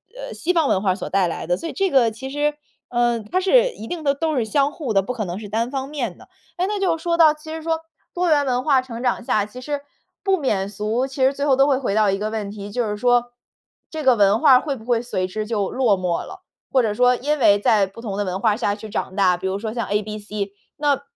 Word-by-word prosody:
呃， - - -7
西 350 - -1
方 330 -5 +2
文 190 - +2
化 190 -2 +2
所 190 - -6
带 190 -2 +2
来 165 - -5
的。 175 - +2
所 330 - -6
以 - - -4
这 390 -1 0
个 250 -7 +4
其 265 +5 -7
实 295 +1 0 0.3
呃， 240 -1 +1
它 360 - -1
是 - - +4
一 225 - -9
定 345 -3 -5
的 280 -1 +3
都 315 +1 -1
是 245 - +1
相 280 +6 +1
互 280 -8 -4
的， 195 -2 +4
不 225 +6 -4
可 225 -4 -3
能 180 +1 -5
是 215 - -8
单 230 +5 -1
方 270 -1 -3
面 250 -11 -4
的。 - - -16 0.3
诶， 365 +2 0
那 415 -1 -2
就 345 -4 +2
说 335 +1 -1
到 315 -2 +7
其 305 +1 -13
实 320 - -6
说 325 0 0 0.4
多 355 0 +1
元 290 -2 +3
文 250 -1 0
化 275 -3 +4
成 240 -2 -8
长 245 -1 0
下， 210 - +1
其 230 +5 -11
实 290 +1 -3 0.4
不 385 -1 +2
免 205 - -1
俗 215 +5 -1
其 265 0 -2
实 265 +1 +4
最 280 +1 -2
后 270 - +5
都 270 +1 +5
会 275 -2 +3
回 240 -7 -1
到 215 -2 +4
一 195 - -1
个 210 +1 -2
问 215 -2 -4
题， 205 -1 -8
就 245 +2 0
是 210 - -2
说 245 +1 +2 0.6
这 315 -1 -5
个 260 -3 +5
文 205 0 +4
化 290 +1 +5
儿 255 - +7
会 285 -3 -3
不 225 -3 -13
会 240 -2 +1
随 210 -6 -2
之 215 +3 -4
就 205 -4 -1
落 235 -7 +2
寞 180 -2 -1
了， - - -11 0.3
或 260 - +4
者 215 - 0
说 250 +3 +4
因 295 +5 -1
为 205 -5 +5
在 205 -2 +3
不 195 +4 -12
同 210 -4 -4
的 205 - 0
文 185 0 -3
化 210 0 +2
下 205 -3 -1
去 220 +1 -9
长 200 -3 -4
大 185 -3 +4
比 190 +1 -4
如 190 - -1
说 220 +1 -4
像 235 -3 -3
ABC， 210 -1 -3 0.3
那 290 -2 +1
240 Hz, 300 characters per minute, -22 LUFS, 210-290 Hz, 0.6 s, 到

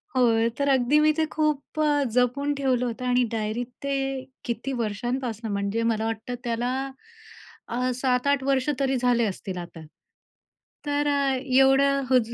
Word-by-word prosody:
होय, 230 -2 +3
तर 280 0 +2
अगदी 265 +2 +4
मी 305 0 +5
ते 320 - +2
खूप 305 -1 -1
अ, 295 -1 +3
जपून 250 +4 +1
ठेवलं 260 -3 +1
होतं 245 +1 -4
आणि 250 0 +3
डायरीत 225 +2 -2 0.2
ते 280 0 -1 0.5
किती 240 +3 -3
वर्षांपासनं 235 0 -3
म्हणजे 200 +3 -1
मला 225 -1 0
वाटतं 225 +2 -3
त्याला 240 +1 -1 0.9
अ, 250 +2 -1
6-7 260 +2 +1
वर्ष 270 0 +1
तरी 270 -1 +1
झाले 245 -1 +2
असतील 190 -2 -4
आता. 170 -2 -8 1.0
तर 290 0 0
अ, 280 -2 +2
एवढं 270 +1 +4
हो 260 -1 +6
ज 230 0 -5
250 Hz, 150 wpm, -25 LUFS, 230-275 Hz, 1.0 s, हो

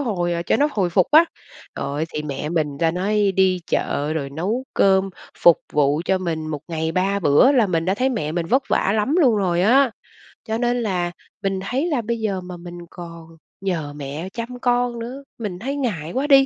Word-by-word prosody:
hồi 175 -9 -1
cho - - +3
nó 290 +2 +3
hồi 185 -4 0
phục 180 0 +3
á. 315 +3 +8 0.5
Trời - - -4
ơi, 145 +3 -2
thì 150 - -2
mẹ 150 0 -4
mình 150 -4 -1
ta 165 -1 +3
nói 200 +3 +1
đi 185 -1 +3
chợ 145 +2 -1
rồi 140 -3 -3
nấu 200 - -2
cơm, 195 0 +3 0.3
phục 170 -2 +6
vụ 145 +1 +2
cho 190 -1 +1
mình 165 -3 -3
một 150 -2 -4
ngày 160 0 -2
3 195 +3 +1
bữa 175 - +5
là 240 -6 +4
mình 165 -3 0
đã 190 - +1
thấy 255 +5 +1
mẹ 210 - -2
mình 170 0 -2
vất 260 +8 +2
vả 195 - +2
lắm 240 +10 +1
luôn 245 -8 +4
rồi 180 -3 +1
á. 255 +4 +5 0.6
Cho 220 - -1
nên 245 0 0
là 180 -4 -1 0.3
mình 195 -1 0
thấy 265 - -1
là 290 -7 0
bây 230 +1 -2
giờ 200 -4 -1
mà 180 0 -8
mình 175 0 -9
còn 170 -2 -10 0.3
nhờ 165 -7 -2
mẹ 150 +5 -5
chăm 245 +1 -6
con 245 -1 +1
nữa, 255 +4 -6 0.2
mình 195 -6 -4
thấy 270 +6 -3
ngại 185 - -2
quá 275 +3 -1
đi, 275 -2 +7
190 Hz, 215 wpm, -22 LUFS, 165-235 Hz, 0.6 s, á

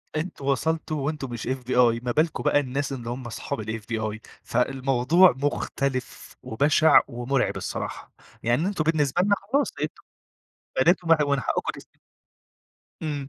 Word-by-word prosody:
أنتم 155 -3 -4
وصلتوا 155 +2 0
وأنتم 140 -2 -3
مش 120 0 -5
FBI، 125 -2 +2
ما 125 - -1
بالكم 155 +5 0
بقى 145 - +4
الناس 140 +1 -2
اللي 120 -2 -6
هُم 125 +1 -5
أصحاب 115 - -5
الFBI، 110 0 -4 0.2
فالموضوع 135 +7 +3
مختلف، 140 -2 -3
وبشع 145 +6 +4
ومرعب 120 +3 -1
الصراحة، - - -5 0.3
يعني 120 +10 +1
أنتم 195 -6 -1
بالنسبة 155 0 +1
لنا 200 +1 +3 0.2
خلاص 285 0 +2
أنتم - - -4 0.8
بنات 175 0 +3
ومن 165 -1 +5
ح - - -6
ومن 140 -1 +1
حقكم - - -1
تس - - -12 1.2
إمم. 145 -3 -3
135 Hz, 140 wpm, -25 LUFS, 120-155 Hz, 1.2 s, ومن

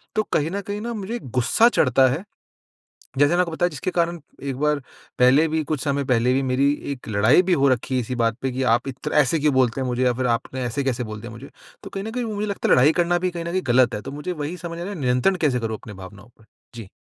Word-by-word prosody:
तो 215 - +2
कहीं 155 +3 +1
न 200 +1 -3
कहीं 205 +1 -3
मुझे 220 +3 -4
ग़ुस्सा 130 - +2
चढ़ता 130 - +3
है। 160 +8 -3 0.9
जैसे 145 +1 +5
मैंने 175 +2 +3
आपको 170 -2 -2
बताया 175 +2 0
जिसके 150 +3 -4
कारण 170 0 0 0.2
एक 135 -2 -3
बार 150 -1 +1 0.4
पहले 130 +6 +5
भी, 160 0 0
कुछ 150 -2 -3
समय 140 -1 0
पहले 125 0 +2
भी 135 - +1
मेरी 135 +2 +2 0.2
एक 135 -3 -8
लड़ाई 110 - +4
भी 180 0 +1
हो 140 -3 +3
रखी 130 +1 0
हैं 125 - +1
इसी 125 +2 -4
बात 115 -2 +1
पे 135 -1 -1
कि 130 +2 -2
आप 120 - -4
इत 135 +3 -5
ऐसे 150 +2 +3
क्यों 150 -1 +2
बोलते 130 0 +2
हैं 130 - -2
मुझे 125 +1 -1
या 125 - +3
फिर 125 +1 -1
आपने 130 +2 -6
ऐसे-कैसे 125 0 -2
बोल 110 -1 -7
दिया 120 0 -8
मुझे? 115 +5 -11 0.3
तो - - -8
कहीं 195 - -5
न 220 - -5
कहीं 245 0 -3
मुझे 210 -1 -3
लगता 200 - -2
है - - +6
लड़ाई 130 +5 +5
करना 175 +1 +1
भी 185 0 -1
कहीं 170 -1 -6
न 170 - -3
कहीं 185 +1 0
गलत 125 0 +4
हैं। 105 - -5
तो 135 - -7
मुझे 150 +5 -5
वही 155 +1 -4
समझना 170 0 -6
है 205 - -5
नियंत्रण 125 +9 +2
कैसे 135 -6 +2
करूँ 110 -1 -3
अपनी 105 - -11
भावनाओं 95 +3 -12
पे? 110 - -21 0.3
जी। 110 -5 -9
140 Hz, 260 wpm, -22 LUFS, 125-170 Hz, 0.9 s, है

